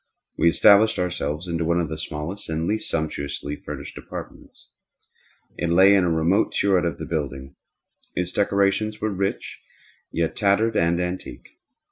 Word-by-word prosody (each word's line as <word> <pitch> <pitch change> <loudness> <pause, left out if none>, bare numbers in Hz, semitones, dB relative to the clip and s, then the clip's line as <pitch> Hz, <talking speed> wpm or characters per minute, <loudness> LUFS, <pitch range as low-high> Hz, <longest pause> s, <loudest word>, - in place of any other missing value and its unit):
We 85 - +4
established 105 +5 +5
ourselves 85 -2 -2
in 85 -1 -1
one 85 +1 +1
of 85 - -1
the 80 - -5
smallest 85 +7 -5
and 80 0 -1
least 110 +4 0
sumptuously 70 -2 -3
furnished - - -8
apartments. - - -10 0.9
It 85 - -1
lay 95 +4 +6
in 100 -2 +4
a - - +1
remote 85 +5 +1
turret 95 -3 +3
of 85 -4 -2
the - - -6
building. 70 -4 -4 0.6
Its 90 0 -1
decorations 100 +2 +1
were 110 0 -1
rich, 95 +1 -3 0.5
yet 80 -1 -1
tattered 105 +2 +2
and 85 -1 +2
antique. 90 +1 -5
85 Hz, 150 wpm, -23 LUFS, 80-100 Hz, 0.9 s, lay